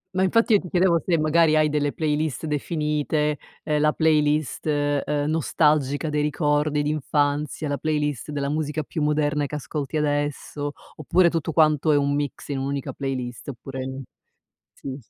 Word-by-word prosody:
ma 190 - +2
infatti, 230 +4 +3
io 205 - +6
ti 180 - -9
chiedevo 175 -2 +3
se 170 -3 +2
magari 155 +1 +4
hai 155 0 +4
delle 145 -1 0
playlist 155 -2 -1
definite, 150 0 -1 0.3
ehm, 150 -1 0
la 150 0 +4
playlist, 150 -2 +1
uhm, 145 0 0
nostalgica 150 -2 +1
dei 150 0 0
ricordi 150 -1 +1
d'infanzia, 150 0 -1
la 145 - -1
playlist 150 -3 -2
della 140 -1 -2
musica 155 0 -2
più 155 +3 -5
moderna 150 -1 +1
che 150 - -6
ascolti 150 +1 -4
adesso; 145 0 -2 0.3
oppure 170 +4 +3
tutto 165 -1 -2
quanto 155 -1 +3
è 145 - +4
un 140 0 +1
mix 145 -1 -3
in 140 -2 -2
un'unica 140 0 -3
playlist. 130 -2 -4
Oppure 130 +1 -6 0.7
sì 135 -1 -7
s - - -31
150 Hz, 160 wpm, -24 LUFS, 145-155 Hz, 0.7 s, io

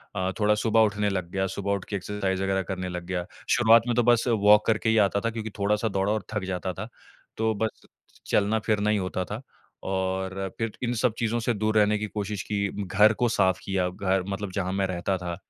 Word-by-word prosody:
अ, 95 0 -1
थोड़ा 105 0 +4
सुबह 110 +1 +2
उठने 105 -1 +2
लग 95 -3 -3
गया, 95 0 0
सुबह 100 +1 -3
उठ 100 -2 -1
के 100 - -4
एक्सरसाइज़ 95 -1 -2
वग़ैरह 95 0 +1
करने 90 0 -4
लग 90 -1 -5
गया। 90 -1 -3 0.2
शुरुआत 115 -1 +6
में 120 - +1
तो 120 - +3
बस 120 -1 +4
वॉक 105 -2 +5
करके 110 0 +2
ही 110 - +3
आता 100 -1 +3
था, 115 - 0
क्योंकि 110 -1 -5
थोड़ा-सा 105 +2 +1
दौड़ा 95 +1 0
और 110 -3 -2
थक 105 -2 -2
जाता 95 0 -3
था, - - -6 0.5
तो 110 0 +1
बस 110 +1 -3 0.4
चलना-फिरना 105 0 +1
ही 105 - +3
होता 95 -1 -2
था 105 +6 -6 0.5
और 95 0 -2
फिर 115 -2 -2
इन 120 0 0
सब 125 -4 +2
चीज़ों 115 0 0
से 120 +1 0
दूर 110 +1 0
रहने 105 0 +4
की 105 - -3
कोशिश 105 -1 -4
की, 100 -1 -1 0.2
घर 105 +4 +5
को 120 +1 +1
साफ़ 95 -4 +2
किया, 95 -2 0
घर 95 0 0
मतलब 100 -1 -4
जहाँ 95 -2 -1
मैं 95 -1 0
रहता 95 +1 -1
था। 85 -1 -4
100 Hz, 220 wpm, -26 LUFS, 95-110 Hz, 0.5 s, शुरुआत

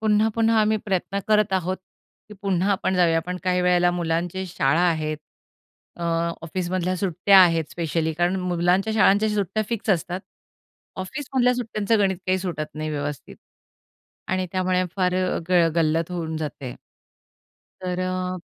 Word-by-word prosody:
पुन्हा-पुन्हा 220 +1 +2
आम्ही 215 0 +2
प्रयत्न 195 0 -1
करत 210 -2 +3
आहोत, 185 0 0 0.5
की 210 - -10
पुन्हा 195 0 +1
आपण 190 -1 -1
जाऊया. 170 -2 +4
हां, 165 - +1
पण 180 0 -3
काही 180 -1 +2
वेळेला 180 0 +3
मुलांची 175 +2 -2
शाळा 155 -1 +1
आहेत. 155 -1 -2 0.8
अ, 175 - -8 0.4
ऑफिसमधल्या 185 +2 -2
सुट्ट्या 190 +1 +4
आहेत 165 -2 +3
स्पेशली, 165 -1 -1
कारण 175 +3 0
मुलांच्या 180 +4 +1
शाळांच्या 215 0 +4
सुट्ट्या 205 +1 0
फिक्स 225 -2 -2
असतात. 180 +1 0 0.8
ऑफिसमधल्या 250 +5 0
सुट्ट्यांचं 225 -3 0
गणित 195 -2 +2
काही 185 0 +2
सुटत 165 -6 -4
नाही 155 0 -4
व्यवस्थित. 145 -1 -5 0.9
आणि 185 0 0
त्यामुळे 185 -1 +1
फार 180 -1 +1
अ, 185 0 0
ग 175 -2 +4
गल्लत 165 +1 +1
होऊन 160 -2 -3
जाते. 145 -5 -5 1.1
तर 180 -1 -3
अ, 185 0 -2
185 Hz, 145 wpm, -23 LUFS, 170-195 Hz, 1.1 s, जाऊया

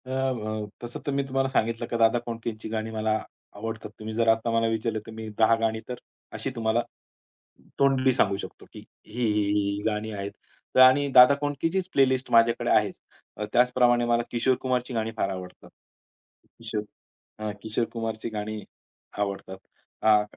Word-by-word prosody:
अ, - - -11
व 110 -5 -2
तसं 120 0 -6
तर 145 - -1
मी 140 0 +1
तुम्हाला 135 0 0
सांगितलं 115 -2 0
की 120 - -2
दादा 115 +1 +4
कोंडकेची 115 -2 -6
गाणी 110 0 -3
मला 110 0 0 0.4
आवडतात. 110 +1 -5
तुम्ही 110 0 -6
जर 115 0 +1
आता 115 +1 +3
मला 115 0 +2
विचारलं 110 0 -1
तर - - -8
मी 110 0 -7
10 110 +1 +6
गाणी 110 0 0
तर 125 - -3 0.4
अशी - - -3
तुम्हाला 115 0 +1 1.0
तोंडी 135 -1 +4
सांगू 100 -4 +2
शकतो - - -9
की - - -9
ही, - - -20
ही, 125 - 0 0.3
ही, 100 -1 +1
ही - - -5
गाणी 110 0 -1
आहेत. 100 -1 -5 0.4
तर - - +5
आणि 130 +2 +7
दादा 125 +2 +10
कोंडकेचीच 165 +6 -1
प्लेलिस्ट 130 -1 +2
माझ्याकडे 115 0 +4
आहेच. - - +3 0.6
त्याचप्रमाणे 125 -1 +4
मला 120 0 +2
किशोर 125 +2 +2
कुमारची 125 -1 -1
गाणी 115 -1 -1
फार 95 - 0
आवडतात. 90 -1 -8 0.9
किशोर 110 -2 -3 0.6
अ, 110 0 -3
किशोर 110 +1 -1
कुमारची 115 -1 -3
गाणी 110 0 -5 0.6
आवडतात. 100 -2 -3 0.5
अ, 105 -1 +5
115 Hz, 165 wpm, -26 LUFS, 110-125 Hz, 1.0 s, दादा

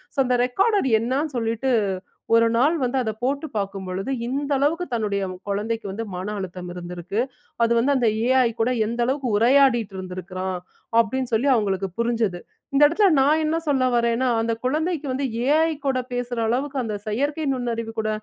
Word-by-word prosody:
So, - - -24
அந்த 250 0 +2
recorder 390 - +2
என்னன்னு 270 +5 -1
சொல்லிட்டு, 230 +3 -1 0.6
ஒரு 230 0 +5
நாள் 290 +7 +3
வந்து 250 +2 0
அத 220 - -1
போட்டு 280 +4 -1
பார்க்கும் 195 -2 -3
பொழுது 190 +8 -3 0.2
இந்த 280 +3 -2
அளவுக்கு 320 +6 +1
தன்னுடைய 205 -4 0 0.3
குழந்தைக்கு 220 +2 -2
வந்து 225 +4 -4
மன 185 +3 -4
அழுத்தம் 180 -1 -6
இருந்திருக்கு. 180 +3 -5 0.4
அது 230 - +2
வந்து 275 +5 +2
அந்த 245 -3 +2 0.2
ஏஐ 255 -2 +4
கூட 230 - +2 0.2
எந்த 235 +1 -2
அளவுக்கு 265 0 -1
உரையாடிட்டு 240 -3 +4
இருந்திருக்கிறான். 185 0 -5 0.4
அப்பிடின்னு 255 +2 0
சொல்லி 240 +6 +2
அவுங்களுக்கு 195 -4 0
புரிஞ்சது. 230 -6 0 0.3
இந்த 285 +2 +5
இடத்தில 395 +6 +3
நான் 300 +4 +4
என்ன 310 +1 +1
சொல்ல 275 -4 +2
வரேன்னா, 235 +1 +2
அந்த 230 0 0
குழந்தைக்கு 310 +3 0
வந்து 270 +2 -1 0.2
ஏஐ 320 +3 +4
கூட 265 -2 +1
பேசுற 245 -1 -3
அளவுக்கு 270 +4 -1
அந்த 215 -3 -3
செயற்கை 285 +8 -1
நுண்ணறிவு 230 -3 -3
கூட 215 0 -1
240 Hz, 165 wpm, -23 LUFS, 215-275 Hz, 0.6 s, ஒரு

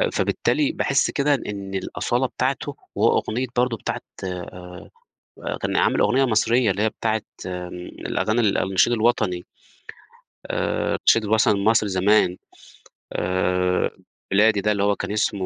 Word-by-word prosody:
آآ، - - +2
فبالتالي 300 0 0
باحس 140 - +1
كده 145 0 +2
إن 100 -6 -5
الأصالة 95 - -1
بتاعته - - -2 0.2
هو - - +4
أغنية 125 +4 -2
برضه 125 -1 +2
بتاعة - - -4 0.2
آآ، 90 -1 -8 0.6
آآ - - -2
كان - - -1
عامل - - +2
أغنية 135 +2 +3
مصريّة 115 -1 +2
اللي 100 +3 -2
هي 110 - +3
بتاعة 110 0 -1 0.2
الأغاني 90 +5 -3
ال 105 -3 +2
النشيد 95 +5 +2
الوطني. 110 -6 +1 1.0
آآ، - - -1
النشيد 115 -2 +3
الوطني 105 -1 +3
لمصر 110 +1 +3
زمان، 95 -1 +3 0.8
آآ 90 0 0 0.4
بلادي 105 +1 +4
ده، 105 +2 +1
اللي 100 -1 -1
هو 100 0 +2
كان - - -4
اسمه 100 -2 0
105 Hz, 140 wpm, -23 LUFS, 95-115 Hz, 1.0 s, هو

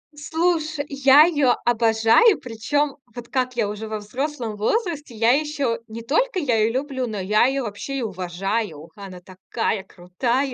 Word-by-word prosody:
Слушай, 315 -1 -1
я 275 +1 +6
её 290 -7 +3
обожаю. 230 - +4
Причём 270 +4 -2 0.2
вот 240 0 -9
как 255 -1 -1
я 225 -3 0
уже 210 +1 -6
во 215 0 -4
взрослом 240 +1 -4
возрасте, 300 - -2
я 225 +2 +3
ещё 280 -4 0
не 225 +1 -8
только 370 - 0
я 265 -8 +1
её 220 +1 +2
люблю, 260 -1 -2
но 215 -3 -4
я 210 +4 +3
её 270 +1 0
вообще 210 +5 -5
и - - -3
уважаю. 190 -3 -3
Она 195 -3 -10
такая 190 +2 -3
крутая! 235 +10 -2
240 Hz, 160 wpm, -22 LUFS, 215-285 Hz, 0.2 s, я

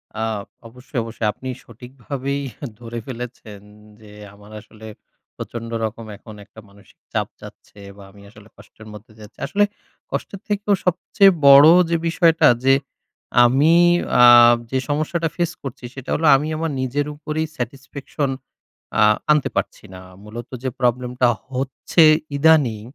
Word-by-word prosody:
আ 110 - -3 0.4
অবশ্যই, 125 +2 -7
অবশ্যই। 115 -1 -4
আপনি 130 - -8
সঠিকভাবেই 130 +4 -6 0.4
ধরে 120 0 -7
ফেলেছেন। 120 -5 -9 0.4
যে 105 -1 -15 0.2
আমার 105 +1 -17
আসলে, 110 +1 -15 0.5
প্রচন্ড 115 -1 -7 0.2
রকম 115 +1 -7
এখন 110 - -13
একটা 110 - -16
মানসিক 100 0 -22 0.2
চাপ - - -1
যাচ্ছে, - - -15 0.2
বা 100 - -13
আমি 100 0 -18
আসলে 105 0 -18
কষ্টের 110 - -16
মধ্যে 110 +2 -14
যাচ্ছি। 105 -1 -15
আসলে 200 +8 +1 0.5
কষ্টের 195 - -5
থেকেও 205 -1 0
সবচেয়ে 185 +2 +3 0.2
বড় 140 +2 +9 0.2
যে 170 - +1
বিষয়টা, 165 -1 +3 0.2
যে 135 0 +4 0.7
আমি 140 +7 +3 0.5
আ - - +8 0.5
যে 130 - 0
সমস্যাটা 155 +3 -1
ফেস 175 -1 -1
করছি, 135 -1 -8
সেটা 130 -2 -10
হলো 160 - 0
আমি 145 +3 -1
আমার 165 0 -3
নিজের 140 +3 -2
উপরেই 155 +1 -4
স্যাটিসফ্যাকশন 135 +3 -5 0.7
আ - - +4 0.3
আনতে 150 -2 +2
পারছি - - -4
না। 90 - -11 0.2
মূলত 110 +3 -9
যে 130 - -1
প্রবলেমটা 125 0 0 0.2
হচ্ছে 135 +5 0 0.3
ইদানিং, 140 -8 +3
130 Hz, 140 wpm, -20 LUFS, 115-150 Hz, 0.7 s, বড়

